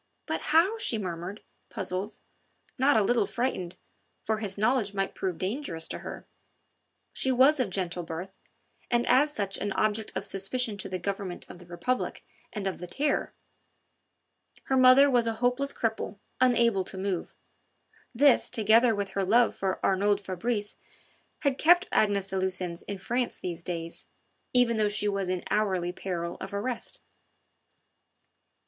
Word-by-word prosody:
"But - - -2
how?" 345 +9 +3
she 235 - 0
murmured, 185 +1 -5 0.3
puzzled, 190 +3 -3 0.6
not 265 -2 +4
a 215 - +4
little 240 +4 +2
frightened, 210 -8 -2 0.5
for 220 0 -1
his 205 -3 -4
knowledge 215 -1 +1
might 195 0 -1
prove 185 -3 -3
dangerous 185 - -3
to - - -4
her. - - -8 0.9
She 265 - +1
was 265 +4 +5
of 245 -6 +1
gentle 180 -2 -1
birth, 170 +3 -6 0.6
and 240 0 +2
as 280 +4 +4
such 200 -7 -1
an 205 - -2
object 215 +2 0
of - - -3
suspicion 215 +4 -1
to 195 0 -5
the 185 - -2
Government 195 -1 -4
of - - -12
the 175 - -14
Republic 175 +9 -2 0.3
and 205 -3 -5
of 190 - -2
the 180 - -6
Terror; 285 +11 -1 1.3
her 265 - 0
mother 255 +2 +7
was 245 -4 +2
a 225 - +1
hopeless 250 +4 0
cripple, 220 -2 -2 0.2
unable 235 -6 +3
to 190 - -7
move: 190 -2 -3 0.8
this 270 +2 +4
together 225 +2 +4
with 200 -1 -2
her 195 - -1
love 230 +5 +4
for 190 -1 -2
Arnould 200 +1 +2
Fabrice 205 +2 -3 0.6
had 280 -3 0
kept 350 +3 +6
Agnes 200 -2 +2
de 190 - -1
Lucines 185 -2 -2
in 200 - -4
France 240 +6 -2
these 170 -2 -5
days, 170 -1 -6 0.4
even 245 -2 +3
though 210 -1 +2
she 210 0 0
was 200 -2 -1
in 185 -1 -2
hourly 190 -5 +1
peril 170 -3 -4
of 195 +1 -6
arrest. 240 +4 -4
205 Hz, 155 wpm, -28 LUFS, 190-245 Hz, 1.3 s, mother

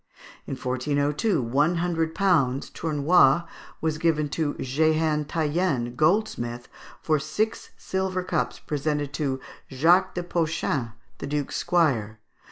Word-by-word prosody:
In 135 - -3
1402, 145 - 0
one 145 +9 +2
hundred 165 -2 -1
pounds 145 -10 +2
(tournois) 155 0 +3 0.4
were 160 - +1
given 155 -1 0
to 150 0 -1
Jehan 155 +2 +1
Taienne, 150 -6 -1
goldsmith, 140 - 0 0.4
for 155 -2 +2
six 210 +10 -2
silver 190 -1 -2
cups 175 -3 -1
presented 145 -1 -2
to 135 -3 -1 0.3
Jacques 175 +8 +3
de 175 - -2
Poschin, 160 -8 -1 0.3
the - - -5
Duke's 145 -1 -2
squire. 130 - +1
155 Hz, 115 wpm, -25 LUFS, 140-170 Hz, 0.4 s, tournois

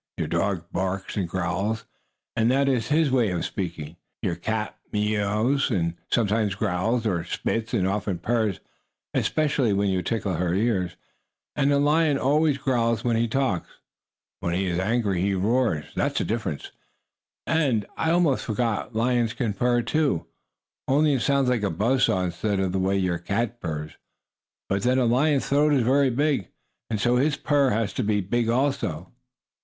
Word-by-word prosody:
Your - - -1
dog 95 -5 -1
barks 95 +1 -3
and 95 -5 -1
growls, 95 +5 -2 0.5
and 115 +1 +2
that 135 +2 +2
is 125 -4 +1
his 150 -1 +2
way 120 -5 +3
of 90 -2 -2
speaking. 85 -4 -5 0.3
Your 95 -5 0
cat 110 +5 -3 0.2
mews 105 +5 +1
and 85 -7 0 0.2
sometimes 105 -2 +1
growls 110 +6 0
or 90 -6 0
"spits," 115 +6 -2
and 95 -4 +1
often 100 -1 -1
purrs, 110 +1 0 0.5
especially 140 -7 +1
when 100 0 +1
you 95 -1 0
tickle 110 -2 -2
her 85 +1 0
ears. 95 -4 0 0.6
And 140 0 +2
a 140 - +4
lion 150 +1 +3
always 145 +2 +2
growls 115 -4 0
when 120 -1 +1
he 115 +1 +1
talks. 125 -7 -1 0.7
When 85 0 -2
he 95 +2 0
is 90 -1 -1
angry 100 -2 0
he 100 +1 +1
roars 105 - +1
that's - - -1
the - - 0
difference. 110 -10 -3 0.7
And, 130 -10 +1
I 160 - 0
almost 165 -5 +2
forgot, 115 +1 -2
lions 120 0 +1
can 115 -5 -1
purr, 120 +3 +1
too, 145 - 0 0.6
only 145 +2 +3
it 130 - 0
sounds 140 -2 +2
like 125 -3 +1
a 100 - 0
buzz 115 +10 +2
saw 95 - +1
instead 95 +3 -1
of 95 -1 0
the 95 - -1
way 95 +1 +1
your 90 -3 0
cat 115 +7 -2
purrs. 75 -2 -4 0.8
But 100 0 0
then 125 +4 +2
a 130 - +3
lion's 135 +4 +2
throat 145 +2 +3
is 135 -4 +3
very 135 +3 +3
big, 140 - 0 0.4
and 110 -2 -1
so 120 +3 +2
his 145 +3 +2
purr 145 -2 +2
has 110 -3 -1
to - - -1
be 105 0 +1
big 115 +4 0
also. 115 - -1
110 Hz, 170 wpm, -25 LUFS, 95-130 Hz, 0.8 s, a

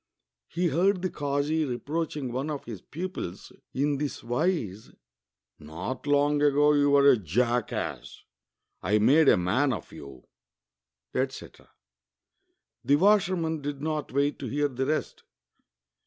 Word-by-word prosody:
He 175 0 -1
heard 185 +4 +1
the 185 - -1
kazi 145 +2 -1
reproach 150 +4 -3
ing 130 -4 -4
one 130 +5 -3
of 145 -2 -4
his 110 -6 -8
pupils 170 - -6 0.2
in 140 +1 0
this 145 -1 -4
wise: 120 - -1 0.7
''Not 85 - -6
long 145 0 +2
ago 145 +1 +4
you 145 -1 +3
were 140 0 +5
a 130 - +4
jackass; 110 - -2 0.6
I 105 +4 +2
made 135 +8 +5
a - - +5
man 110 +11 +1
of 105 -10 -5
you," 70 -3 -11 0.9
etc. 130 +1 -4 1.1
The 140 - +4
washer 190 +2 +4
man 160 -3 -2
did 145 0 -5
not 155 -1 -2
wait 140 +1 0
to - - -5
hear 145 +1 0
the 130 0 -3
rest. 155 +1 -2
145 Hz, 140 wpm, -27 LUFS, 120-155 Hz, 1.1 s, were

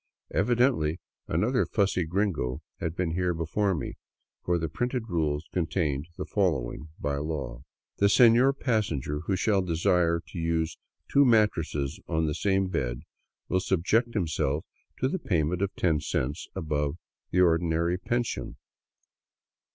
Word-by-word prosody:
Evidently 115 - +2 0.3
another 125 +3 +2
fussy 100 -4 +1
gringo 85 -8 -1 0.2
had 80 0 -3
been 90 -2 -1
here 90 0 0
before 90 +5 0
me, - - -5 0.5
for 90 0 +1
the 80 -1 -1
printed 120 - -2
rules 80 -3 -1
contained 80 -4 -1
the - - -3
following 80 - -1
by 70 -1 -1
law: 70 -5 -4 0.2
" - - -65
The 100 - +5
senor 120 +4 +6
passenger 105 - -1
who 95 - +2
shall 100 +1 +2
desire 85 -1 +2
to 85 - -6
use 80 -1 -1 0.3
two 140 - +5
mattresses 85 - +2
on 80 -1 +1
the 75 - 0
same 95 +3 +1
bed - - -2 0.5
will 95 - +1
subject 105 +7 +1
himself 80 -5 0 0.4
to 130 - +3
the 185 +8 -2
payment 85 - 0
of 100 - +1
ten 80 -4 +2
cents 70 +2 -2
above 75 -4 -1 0.3
the 90 - +3
or 85 -2 +5
dinary 85 +2 0
pension." 120 -1 -2
85 Hz, 145 wpm, -28 LUFS, 80-100 Hz, 0.5 s, senor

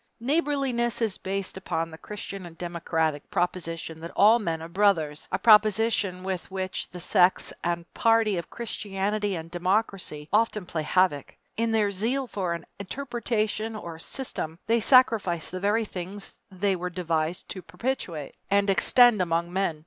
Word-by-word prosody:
Neighborliness 270 -4 0
is 220 -5 0
based 195 0 -3
upon 165 -3 -3
the 160 - -9
Christian 195 -3 -7
and 165 -1 -14
democratic 165 -3 -2
proposition 165 -2 -2
that 165 +1 -7
all 220 +4 +6
men 165 -7 -2
are - - -6
brothers 170 -5 +1
a - - +1
proposition 210 -3 +4
with 190 -2 -4
which 190 0 -4
the 180 - -9
sects 180 +1 +3
and 170 -1 -1
parties 225 -4 +3
of 170 - -8
Christianity 205 -2 -2
and 165 0 -7
democracy 180 -4 -1
often 215 -2 +2
play 165 -2 -3
havoc. 155 -3 +1 0.2
In 230 0 0
their 215 -2 +2
zeal 235 +8 -1
for 190 -7 -2
an 170 - -9
interpretation 225 -1 -2
or 170 -6 -7
system 165 - -4
they 230 +1 +3
sacrifice 220 - +4
the 185 - -4
very 210 +4 +1
things 195 +1 -7 0.2
they 195 0 0
were 180 0 -4
devised 170 -1 -2
to 185 - -6
perpetuate 180 - -4 0.2
and 200 0 +3
extend 215 +4 +6
among 170 0 -1
men. 185 -5 0
190 Hz, 155 wpm, -26 LUFS, 170-220 Hz, 0.2 s, all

